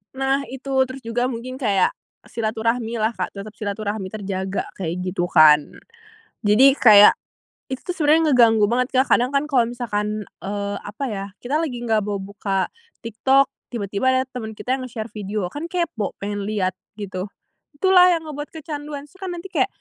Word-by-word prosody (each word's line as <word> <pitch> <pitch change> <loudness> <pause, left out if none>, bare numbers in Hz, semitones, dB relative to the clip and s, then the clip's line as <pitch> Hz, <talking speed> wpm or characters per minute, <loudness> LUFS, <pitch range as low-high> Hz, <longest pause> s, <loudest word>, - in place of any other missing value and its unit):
Nah 270 +1 0
itu, 270 +1 -7 0.2
terus 260 0 -9
juga 235 +2 -1
mungkin 255 +2 -6
kayak 200 -7 +2 0.3
silaturahmi 230 +1 -2
lah, 220 +1 +1
Kak, - - -4
tetap 205 +2 -8
silaturahmi 205 -1 -4
terjaga 195 -2 -3 0.2
kayak 170 -3 -2
gitu 180 -1 -1
kan. 150 -3 +6 0.7
Jadi 250 +7 +6
kayak 210 -5 +8 0.5
itu 260 -1 -6
tuh - - -3
sebenarnya 315 -1 +3
ngeganggu 225 -4 +5
banget, 250 +1 +2
Kak. 260 +1 +3
Kadang 245 +1 +4
kan 275 - +3
kalau 260 -6 +2
misalkan, 215 -3 -3 0.2
eee, 200 0 -3
apa 210 +7 -7
ya, 195 -1 -4 0.2
kita 285 +6 0
lagi 250 -7 -3
nggak 220 -2 +2
bau 205 0 -3
buka 195 -1 -3 0.3
TikTok, 265 +5 +2 0.2
tiba-tiba 205 0 -2
ada 260 0 +3
teman 220 -4 -6
kita 255 +5 -2
yang 255 - -5
nge-share 220 -2 -6
video, 205 -3 -4
kan 305 +3 -5
kepo 340 - -2
pengen 205 0 -4
liat 195 -4 0 0.2
gitu. 195 -2 -5 0.5
Itulah 365 +3 +6
yang 335 -2 +1
ngebuat 295 -1 -6
kecanduan. 295 -2 -6
Terus 375 +6 -22
kan 365 -2 -4
nanti 360 +2 -9
kayak - - +2
230 Hz, 170 wpm, -22 LUFS, 205-270 Hz, 0.7 s, kayak